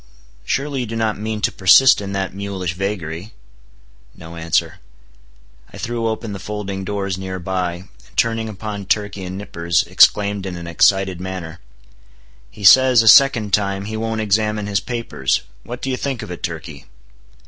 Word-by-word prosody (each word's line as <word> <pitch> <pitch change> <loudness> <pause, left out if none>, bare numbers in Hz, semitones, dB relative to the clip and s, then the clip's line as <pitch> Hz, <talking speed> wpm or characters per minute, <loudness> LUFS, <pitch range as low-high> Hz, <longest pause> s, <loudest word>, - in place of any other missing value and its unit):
Surely 140 - -2
you 125 - -3
do 115 - -5
not 110 -2 -1
mean 110 0 -4
to - - +1
persist 105 +7 +6
in 100 -1 -5
that 95 -1 -3
mulish 95 -3 -4
vagary?" 95 0 -5 0.8
No 80 +1 -11
answer. 80 -1 -1 0.9
I - - -11
threw 115 -1 -3
open 110 -1 -4
the 100 - -6
folding 100 -1 -5
doors 100 -1 -3
near 95 0 -5
by, 90 -1 -2
and 90 +3 -13 0.3
turning 115 -1 +1
upon 105 -1 -6
Turkey 100 -2 -1
and 90 +1 -6
Nippers, 85 -4 -1
exclaimed 100 -1 +3
in 90 - -5
an 85 0 -7
excited 95 +2 +2
manner— 90 -2 -6 0.9
"He 105 - -13
says, 130 +3 +7
a - - -1
second 115 -5 +6
time, 100 -1 0
he 110 +1 -5
won't 110 0 -2
examine 105 0 0
his 100 -1 0
papers. 115 - -2 0.2
What 120 0 -8
do 135 - -1
you 130 - -1
think 130 -4 -3
of 105 - -8
it, 90 - -7
Turkey?" 80 -4 -6
100 Hz, 170 wpm, -19 LUFS, 95-110 Hz, 0.9 s, says